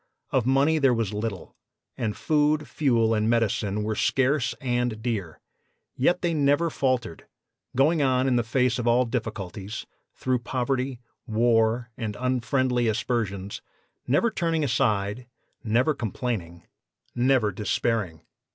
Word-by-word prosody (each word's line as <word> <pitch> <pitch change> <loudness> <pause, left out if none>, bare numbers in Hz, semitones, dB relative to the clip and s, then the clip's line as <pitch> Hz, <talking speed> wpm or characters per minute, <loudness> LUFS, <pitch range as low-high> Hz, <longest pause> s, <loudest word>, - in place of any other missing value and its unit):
Of 125 -2 +1
money 140 +4 +3
there 135 -4 +4
was 115 -3 -1
little, 105 -4 -4 0.4
and 110 -3 -3
food, 150 0 +1
fuel 115 -6 +2
and 110 0 +1
medicine 105 -3 +1
were 110 +1 -1
scarce 135 +4 +1
and 120 -4 -1
dear; 110 -8 -3 0.6
yet 175 +8 +1
they 170 -1 +1
never 145 +2 +2
faltered, 125 - -1 0.5
going 150 +5 +3
on 130 -1 +2
in 130 - +2
the 120 - +3
face 125 +1 +1
of 120 - -2
all 120 +2 +4
difficulties, 110 -3 -5 0.3
through 130 -1 0
poverty, 130 +1 -2 0.3
war 115 +1 +2
and 110 -3 -4
unfriendly 125 -1 +1
aspersions, 105 -3 -2 0.5
never 185 - +2
turning 165 -5 0
aside, 115 -3 0 0.4
never 120 +7 +2
complaining, 105 - -4 0.5
never 125 -3 +2
despairing. 105 -4 -2
120 Hz, 125 wpm, -26 LUFS, 110-135 Hz, 0.6 s, there